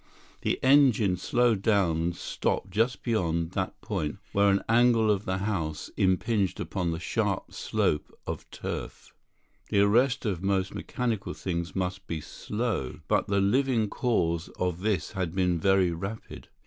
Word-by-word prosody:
The - - 0
engine 130 -8 +5
slowed 120 +2 +1
down 95 -7 +2
and 85 +1 -1
stopped 95 - -2
just 115 +6 0
beyond 85 -8 0
that 95 0 -3
point 80 -8 -3
where 100 0 +4
an 100 0 +2
angle 115 -1 +4
of 105 0 -1
the 95 0 -1
house 90 -7 -3
impinged 95 0 +1
upon 90 -4 -2
the 80 0 -2
sharp 85 - -1
slope 75 - -1
of - - -6
turf. - - -6 0.6
The 100 - +3
arrest 125 +6 +3
of 95 -5 -1
most 95 -1 0
mechanical 115 -5 -3
things 85 -1 -3
must 95 0 -3
be 85 - -3
slow; 105 - -3
but - - +2
the 100 0 +2
living 120 +1 +2
cause 85 -9 0
of 90 -1 -1
this 100 -6 0
had 90 -2 -3
been 90 -3 +1
very 95 0 +3
rapid. 95 +6 -6
95 Hz, 150 wpm, -28 LUFS, 90-110 Hz, 0.6 s, engine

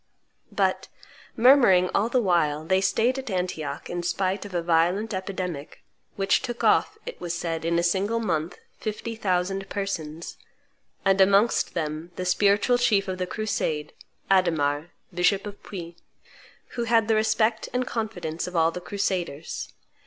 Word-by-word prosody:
But, - - 0 0.5
murmuring 230 -8 +6
all 215 +3 +2
the 245 0 +2
while, 155 -5 +1
they 190 +3 +2
staid 235 +7 +1
at 265 - -7
Antioch, 175 -6 -3
in 175 0 -3
spite 190 +3 -1
of 195 -3 -8
a 170 - 0
violent 175 +6 +2
epidemic, 185 -6 -5 0.3
which 195 0 +2
took 240 -1 -5
off, - - +3
it - - -8
was 175 -1 -3
said, 165 -2 -3
in 170 +1 +1
a 170 - +2
single 195 +6 +1
month, 165 -6 -2 0.2
fifty 220 +1 -4
thousand 195 -1 -1
persons, 170 -5 -4 0.7
and 195 0 +4
amongst 200 +4 +3
them 155 0 -3
the 185 - -4
spiritual 200 +6 +3
chief 205 -5 +2
of 185 -1 -4
the 185 - -1
crusade, 170 -8 -2 0.4
Adhemar, 160 -4 +2 0.2
bishop 190 +3 +2
of 205 -1 -8
Puy, 170 -3 -8 0.7
who 235 -1 -3
had 225 -1 +3
the 225 - +3
respect 220 +1 +1
and 250 0 0
confidence 180 -10 -4
of 180 - -7
all 165 0 +3
the 180 - -6
crusaders. 180 -5 -3
190 Hz, 155 wpm, -25 LUFS, 170-215 Hz, 0.7 s, murmuring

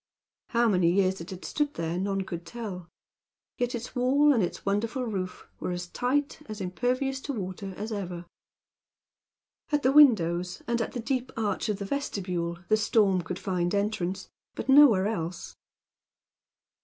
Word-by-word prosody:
How 235 0 +2
many 180 -5 +3
years 190 -1 +2
it 170 - -8
had 185 -1 -8
stood 295 -1 -1
there, 165 +1 -2
none 195 0 -1
could 175 -2 -6
tell; 190 -6 -7 0.7
yet 245 0 0
its 235 +1 -7
wall, 280 +4 +4
and 235 - +2
its 180 - -3
wonderful 225 +6 0
roof, 190 -5 -4
were - - -3
as 175 0 -3
tight, 265 - -1
as 215 0 -6
impervious 250 +8 -1
to 285 - -4
water, 190 -2 -5
as 215 +2 -5
ever. 180 -4 -4 1.5
At 295 -1 +1
the 260 - +4
open 275 - +3
windows, 180 -5 -2
and 235 0 0
at - - -3
the 245 - -3
deep 255 +1 -2
arch 215 -1 -1
of 210 - 0
the 200 - -5
vestibule, 180 -9 -2
the 215 - +4
storm 205 -4 +3
could 175 +2 -5
find 180 -1 -1
entrance; 195 -2 -1 0.3
but - - -5
nowhere 265 -9 +7
else. 175 -5 -3
200 Hz, 165 wpm, -28 LUFS, 180-245 Hz, 1.5 s, nowhere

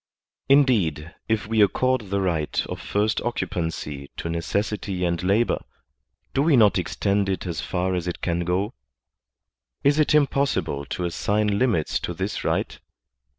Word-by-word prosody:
Indeed, 100 - +3 0.2
if 110 -1 +1
we 110 0 +2
accord 125 +1 +2
the 100 0 0
right 85 -5 0
of - - -6
first 105 +1 0
occupancy 80 -9 -3
to 85 - -4
necessity 95 +2 -2
and 85 -1 0
labor, 100 +6 +1 0.7
do 135 - +2
we 150 -2 +4
not 105 -4 +5
extend 100 +2 0
it 95 -1 -2
as 85 -4 -3
far 95 0 -1
as 90 -1 -2
it 90 - -3
can 85 -1 -1
go? 90 +4 -1 1.1
Is 145 +2 +4
it 150 0 +3
impossible 135 - +1
to 90 +6 -3
assign 105 +4 0
limits 110 -12 +1
to - - -4
this - - -3
right - - -1
95 Hz, 150 wpm, -24 LUFS, 85-110 Hz, 1.1 s, not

